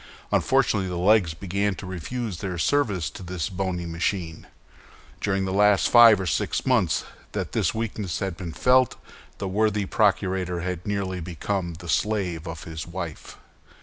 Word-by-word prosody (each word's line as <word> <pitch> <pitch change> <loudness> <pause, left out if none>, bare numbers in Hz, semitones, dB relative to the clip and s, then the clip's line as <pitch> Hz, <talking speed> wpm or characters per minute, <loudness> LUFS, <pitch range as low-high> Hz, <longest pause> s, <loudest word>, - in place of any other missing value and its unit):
Unfortunately 95 -2 +2
the 90 - -4
legs 90 -3 +3
began 100 +2 -1
to 100 - -8
refuse 95 +2 -4
their 90 -3 -4
service 100 - +1
to - - -10
this 90 0 -3
bony 95 -2 -3
machine. 85 0 -3 0.7
During 95 -1 0
the 95 - -2
last 105 0 +4
five 115 -4 +8
or 95 - -2
six 85 - -1
months - - +2 0.3
that - - -3
this - - 0
weakness 105 -6 -3
had 95 -3 -3
been 85 -2 -6
felt, 125 +8 +3 0.4
the 100 - -3
worthy 105 +1 +1
procurator 95 -3 +1
had 90 0 -4
nearly 95 -3 -2
become 85 +1 -3
the 85 +1 -10
slave 90 -4 -1
of 80 -2 -6
his 80 -1 -6
wife. 85 -3 -7
95 Hz, 155 wpm, -25 LUFS, 85-105 Hz, 0.7 s, five